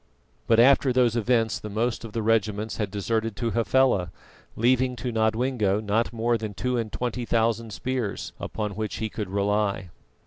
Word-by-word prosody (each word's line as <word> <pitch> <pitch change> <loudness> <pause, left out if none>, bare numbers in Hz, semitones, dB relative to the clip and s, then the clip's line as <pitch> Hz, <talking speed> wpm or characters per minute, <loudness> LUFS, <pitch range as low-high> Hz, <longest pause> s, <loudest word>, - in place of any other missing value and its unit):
But 115 -1 +4
after 130 +2 +5
those 125 -2 +3
events 115 -1 +1
the 105 - -7
most 115 +4 -1
of 115 - -7
the 115 0 -2
regiments 110 -1 0
had 105 -3 -1
deserted 110 +2 -2
to 115 0 -2
Hafela, 115 -4 +2 0.5
leaving 125 +2 +2
to 120 +1 -4
Nodwengo 110 -2 +1
not 110 +2 0
more 115 0 0
than 105 -2 -5
two 125 +4 -1
and 115 -3 -2
twenty 125 0 -3
thousand 115 -1 0
spears 115 +1 -3
upon 105 -1 -3
which 105 +1 -4
he 110 0 -3
could 105 -2 -5
rely. 100 -2 0
115 Hz, 170 wpm, -25 LUFS, 105-120 Hz, 0.5 s, after